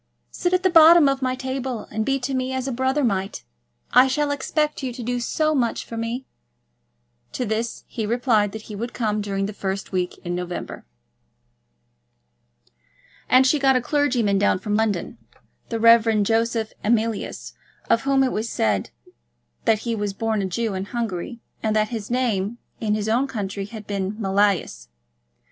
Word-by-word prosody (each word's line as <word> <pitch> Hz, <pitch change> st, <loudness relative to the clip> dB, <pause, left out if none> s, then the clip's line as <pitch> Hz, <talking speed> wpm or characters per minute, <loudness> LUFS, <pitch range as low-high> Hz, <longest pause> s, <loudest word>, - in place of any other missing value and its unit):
Sit 355 Hz, -, -1 dB
at 365 Hz, 0 st, +2 dB
the 375 Hz, -, +3 dB
bottom 330 Hz, -1 st, +8 dB
of 275 Hz, 0 st, 0 dB
my 255 Hz, 0 st, 0 dB
table, 260 Hz, -3 st, -4 dB
and 220 Hz, +1 st, -1 dB
be 275 Hz, +4 st, +1 dB
to 260 Hz, +2 st, -2 dB
me 260 Hz, 0 st, -1 dB
as 260 Hz, 0 st, -2 dB
a -, -, -1 dB
brother 260 Hz, +4 st, 0 dB
might. 195 Hz, -4 st, -1 dB, 0.5 s
I 255 Hz, +1 st, +7 dB
shall 290 Hz, +2 st, 0 dB
expect 300 Hz, +2 st, -1 dB
you 260 Hz, -2 st, -3 dB
to 245 Hz, 0 st, -7 dB
do 245 Hz, +1 st, -1 dB
so 310 Hz, +6 st, 0 dB
much 245 Hz, -5 st, 0 dB
for 230 Hz, -, -8 dB
me." 230 Hz, +3 st, -3 dB, 1.1 s
To 250 Hz, -, -2 dB
this 225 Hz, +2 st, -3 dB
he 230 Hz, -, -6 dB
had 210 Hz, -, -2 dB
replied 230 Hz, -4 st, +2 dB
that 220 Hz, 0 st, -7 dB
he 215 Hz, -, -8 dB
would 235 Hz, +4 st, -5 dB
come 215 Hz, -3 st, 0 dB
during 195 Hz, -1 st, -2 dB
the 210 Hz, -, -5 dB
first 195 Hz, -1 st, -4 dB
week 180 Hz, -2 st, -2 dB
in 175 Hz, -, -2 dB
November. 180 Hz, -, -5 dB, 2.4 s
And 255 Hz, +1 st, +6 dB
she 290 Hz, +3 st, +3 dB
got 270 Hz, -1 st, +4 dB
a -, -, +4 dB
clergyman 245 Hz, -7 st, +1 dB
down 205 Hz, -, +3 dB
from 205 Hz, +3 st, -2 dB
London, 210 Hz, -5 st, -1 dB, 0.5 s
the 230 Hz, -, -2 dB
Rev. 225 Hz, -2 st, +5 dB
Joseph 225 Hz, +1 st, 0 dB
Emilius, 225 Hz, -1 st, -1 dB, 0.3 s
of 230 Hz, -, +3 dB
whom 275 Hz, 0 st, +2 dB
it 260 Hz, -, +1 dB
was 220 Hz, +2 st, -2 dB
said 105 Hz, -, 0 dB, 0.8 s
that 220 Hz, -, +3 dB
he 235 Hz, -, 0 dB
was 205 Hz, -2 st, -2 dB
born 220 Hz, 0 st, -1 dB
a -, -, -1 dB
Jew 220 Hz, +3 st, -2 dB
in 190 Hz, 0 st, -3 dB
Hungary, 230 Hz, 0 st, -4 dB, 0.2 s
and 215 Hz, -1 st, 0 dB
that 215 Hz, 0 st, +2 dB
his 220 Hz, -4 st, -5 dB
name 235 Hz, -4 st, 0 dB, 0.2 s
in 210 Hz, -2 st, 0 dB
his 215 Hz, 0 st, -2 dB
own 240 Hz, +5 st, +2 dB
country 200 Hz, -5 st, -4 dB
had 210 Hz, 0 st, -9 dB
been 195 Hz, -1 st, -2 dB
Mealyus. 195 Hz, -, +1 dB
230 Hz, 180 wpm, -23 LUFS, 205-255 Hz, 2.4 s, bottom